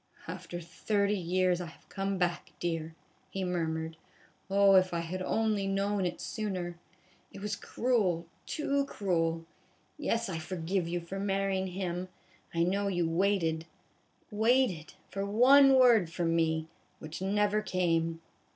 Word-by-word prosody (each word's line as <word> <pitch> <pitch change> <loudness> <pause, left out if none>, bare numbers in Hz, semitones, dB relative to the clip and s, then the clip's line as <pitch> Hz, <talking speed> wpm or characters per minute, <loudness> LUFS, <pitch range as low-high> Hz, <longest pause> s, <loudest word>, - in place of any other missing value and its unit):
" - - -21
After 175 - -6
thirty 200 +4 0
years 180 0 +1
1 175 - -4
1 160 - -12
have - - -28
come 195 0 -2
back, 175 -1 -1
dear," 165 -2 -3 0.3
he 195 - -3
murmured. 160 -2 -2 0.3
" - - -33
Oh, 200 0 +5
if 185 -2 +4
I 170 - 0
had 180 +3 -4
only 215 0 0
known 195 -1 0
it 175 - -5
sooner! 185 -5 -4 0.5
It - - -10
was 205 0 -2
cruel, 200 -8 0 0.2
too 280 -2 0
cruel! 165 -8 -1 0.5
Yes, 230 -5 0
I 170 -4 -3
forgive 175 +1 -2
you 175 +1 -2
for 185 +3 -6
marryin' 195 -1 0
him 180 -1 -3 0.4
1 - - -14
I 170 - +3
know 200 +3 +1
you 175 -4 +1
waited 165 -2 +1 0.6
waited 220 -6 +2
for 195 - -4
one 265 +7 +6
word 235 -9 +6
from 165 0 0
me, 160 -1 +1 0.3
which 155 +3 -8
never 210 +2 +2
came." 165 -4 0
185 Hz, 150 wpm, -31 LUFS, 170-200 Hz, 0.6 s, one